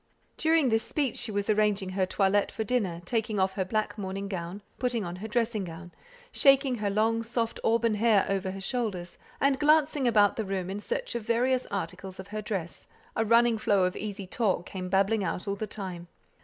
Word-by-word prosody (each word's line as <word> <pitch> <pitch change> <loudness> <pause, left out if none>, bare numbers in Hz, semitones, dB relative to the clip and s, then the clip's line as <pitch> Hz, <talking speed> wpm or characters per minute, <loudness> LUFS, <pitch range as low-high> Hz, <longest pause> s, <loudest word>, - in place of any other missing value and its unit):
During 320 -4 +3
this 225 0 +2
speech 280 -1 -1
she 225 - -1
was 205 -1 -1
arranging 210 -2 +2
her 185 0 0
toilette 195 +1 +2
for 220 - -3
dinner 200 -7 -1
taking 220 0 -1
off 190 0 +2
her 190 - -1
black 215 +2 -2
morning 195 0 -4
gown; 185 +1 -5 0.2
putting 240 -5 0
on 175 +1 -5
her 210 +4 -6
dressing 225 -2 0
gown; 175 0 -9 0.4
shaking 275 -2 +4
her 205 -1 0
long 220 +3 +1
soft 230 0 -2
auburn 230 0 +2
hair 215 -2 +3
over 195 -1 -1
her 195 +1 -5
shoulders, 195 -6 -3 0.2
and 275 -1 +2
glancing 300 -2 +3
about 210 -3 +4
the 220 - 0
room 190 -2 -3
in 200 - -4
search - - -3
of 235 - -2
various 245 +3 +1
articles 190 0 -5
of 190 +1 -8
her 215 +1 -4
dress, 190 -6 -5 0.3
a 225 - +2
running 230 0 +4
flow 200 -3 +3
of 180 0 0
easy 205 -2 -5
talk 190 -3 0
came 185 -1 -6
babbling 200 +3 +2
out 180 +2 -3
all 200 - 0
the 215 +2 -4
time. 185 -4 -6
210 Hz, 200 wpm, -28 LUFS, 190-230 Hz, 0.4 s, shaking